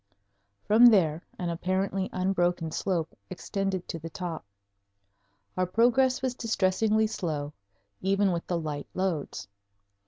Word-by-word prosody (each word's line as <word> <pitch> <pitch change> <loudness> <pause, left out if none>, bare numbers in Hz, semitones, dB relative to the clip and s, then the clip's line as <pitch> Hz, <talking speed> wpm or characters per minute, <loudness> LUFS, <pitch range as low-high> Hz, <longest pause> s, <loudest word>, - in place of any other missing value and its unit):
From 225 +3 +7
there 170 -8 +4 0.2
an 175 -2 -2
apparently 190 +2 -1
unbroken 175 -3 0
slope 165 -2 -2
extended 190 0 -3
to 165 - -5
the 165 +1 -7
top. 170 -1 -5 1.1
Our 185 0 +1
progress 245 +6 +3
was 260 -2 0
distressingly 220 -1 +1
slow, 155 -8 -3 0.5
even 195 +1 +2
with 170 -1 -3
the 175 -2 0
light 150 -3 -4
loads. 185 -6 -2
185 Hz, 120 wpm, -28 LUFS, 170-205 Hz, 1.1 s, From